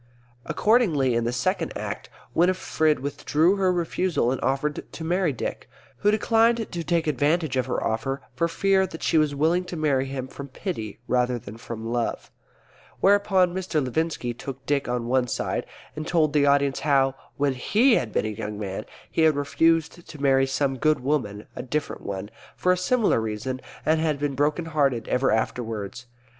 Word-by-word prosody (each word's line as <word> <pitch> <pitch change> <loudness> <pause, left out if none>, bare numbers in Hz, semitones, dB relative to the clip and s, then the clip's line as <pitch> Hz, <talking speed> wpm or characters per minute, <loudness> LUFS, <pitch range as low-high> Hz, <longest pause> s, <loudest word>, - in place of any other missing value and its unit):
Accordingly 175 - +3
in 115 0 +1
the 120 - 0
Second 120 -1 -1
Act - - -5 0.2
Winifred 165 -4 +2
withdrew 155 +6 +1
her 190 -1 +3
refusal 175 -6 0
and 130 - -2
offered 140 +2 -1
to 160 - -7
marry 175 0 +1
Dick, 125 - -5 0.3
who 205 - +2
declined 225 +1 +2
to 170 -1 -3
take 165 +1 +1
advantage 150 +1 +1
of 130 0 0
her 125 - -1
offer 135 +5 -2
for 150 +7 +1
fear 190 +3 +2
that 160 - -9
she 160 - +3
was 150 -2 +1
willing 165 +5 +2
to 175 -1 -6
marry 140 -4 +1
him 135 -1 -4
from 140 +1 -8
pity 130 - -5
rather 125 0 +1
than 105 -2 -9
from 115 0 -7
love; 120 0 -2 0.7
whereupon 195 -2 +4
Mr. 185 -4 -1
Levinski 135 -2 -1
took 135 +2 -8
Dick 140 -3 0
on 120 -1 -1
one 125 +1 +1
side - - -2 0.3
and 155 +1 -5
told 155 -4 +2
the 145 -1 +4
audience 140 -1 +3
how, 135 -3 +3 0.2
when 140 -1 +1
he 220 - +3
had 120 - +1
been - - 0
a - - -1
young 105 -1 -5
man, 95 -2 -4 0.3
he - - 0
had 160 -2 +5
refused 165 +4 +1
to 155 - -10
marry 135 -1 +3
some 135 0 0
good 155 0 +2
woman 125 -7 -1
(a - - -4
different 145 +4 -3
one) 100 +1 -5 0.2
for 180 - +2
a - - +4
similar 200 - +2
reason, 110 +4 -3 0.2
and 160 0 +3
had 155 -3 +1
been 145 0 -1
broken 150 +5 0
hearted 140 -7 0
ever 130 +1 +2
afterwards. 110 +1 -2
145 Hz, 180 wpm, -25 LUFS, 125-165 Hz, 0.7 s, had